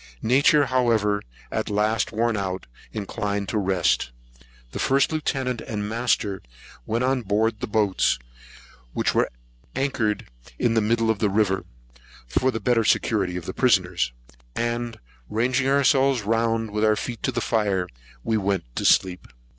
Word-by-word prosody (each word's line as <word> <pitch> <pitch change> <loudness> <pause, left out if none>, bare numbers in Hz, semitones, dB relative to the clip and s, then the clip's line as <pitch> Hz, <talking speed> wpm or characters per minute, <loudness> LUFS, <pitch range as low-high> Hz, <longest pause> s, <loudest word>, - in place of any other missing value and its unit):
Nature, 140 +5 +4
however, 115 -5 +2 0.3
at - - -2
last 105 +1 +1
worn 115 +1 +1
out, 95 -2 -3 0.3
inclined 100 -1 -3
to 110 - -1
rest. 95 -9 +1 0.6
The - - -5
First 135 +3 +2
Lieutenant 135 -5 -1
and 105 -2 -4
Master 110 -3 0 0.5
went 115 +3 0
on 130 0 +1
board 110 +2 +1
of 105 - -27
the 125 - -3
boats, 105 - +2 0.8
which - - 0
were - - +3
at - - -20 0.5
anchor 120 -6 +1 0.4
in 115 - +1
the 115 - +3
middle 115 +1 +2
of 110 - -3
the 105 - +2
river, 100 -2 +1 0.6
for 125 - +1
the 115 - -2
better 120 -2 +2
security 95 -4 +1
of 85 - -6
the - - -4
prisoners; 90 - +2 0.4
and, 120 0 -2 0.3
ranging 125 +4 +1
ourselves 135 -2 +3
round, 115 0 0
with 105 +1 -1
our 110 0 +4
feet 120 +1 -5
to 130 - 0
the 120 - -2
fire, 105 -5 0 0.4
went 100 -4 0
to - - -1
sleep. 90 -1 +3
110 Hz, 155 wpm, -24 LUFS, 100-120 Hz, 0.8 s, Nature